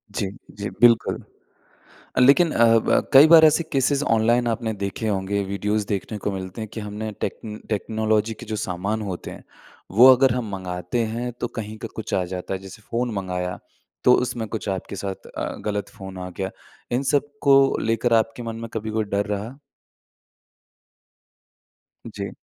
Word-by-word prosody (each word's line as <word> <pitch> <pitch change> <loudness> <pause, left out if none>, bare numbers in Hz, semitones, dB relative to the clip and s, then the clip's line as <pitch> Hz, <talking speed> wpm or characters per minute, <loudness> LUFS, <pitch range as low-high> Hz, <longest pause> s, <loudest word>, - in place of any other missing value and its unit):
जी। 100 - -1 0.3
जी, 100 0 -4
बिल्कुल। 120 -2 +5 1.0
अ, - - +3
लेकिन 140 +7 +6
अ, 115 - +4
ब - - +1
कई 135 +3 +9
बार 160 -1 +9
ऐसे 160 +2 +4
केसेज़ 140 +1 +2
ऑनलाइन 120 +2 +2
आपने 115 -1 -1
देखे 100 +3 -2
होंगे, 100 0 -1
वीडियोज़ 105 +2 -1
देखने 105 +2 -3
को 105 - +1
मिलते 95 +1 -6
हैं, 110 - -5
कि 110 - -4
हमने 105 +1 -5
टेक्न 105 +2 -5
टेक्नोलॉज़ी 110 0 0
के 120 - -9
जो - - -1
सामान 100 +5 -2
होते 90 - -6
हैं, - - -11 0.5
वो 115 +7 +7
अगर 130 -1 +3
हम 120 -4 -3
मँगाते 90 +2 -4 0.2
हैं, 120 +1 -3
तो 120 0 -4
कहीं 110 0 -5
का 115 - -6
कुछ 110 - -4
आ 95 - +1
जाता 90 +1 -4
है, 95 - -5
जैसे 95 +2 -12
फ़ोन 120 +1 -1
मँगाया 90 -2 -3 0.5
तो 125 - +7
उसमें 120 -2 -4
कुछ 110 -1 -5
आपके 95 +1 -4
साथ 95 0 -6
अ, - - -5 0.2
गलत 105 -1 -2
फ़ोन 95 -3 -10
आ 90 0 -5
गया। 95 0 -3 0.4
इन 125 +2 +1
सब 145 +1 +1
को 135 -1 +5
लेकर, 115 +1 0
आपके 115 +1 +1
मन 115 -1 -5
में 115 0 -6
कभी 110 0 -3
कोई 110 0 0
डर 100 0 -1
रहा? 105 +5 -4 2.5
जी। - - -5
110 Hz, 175 wpm, -23 LUFS, 100-120 Hz, 2.5 s, कई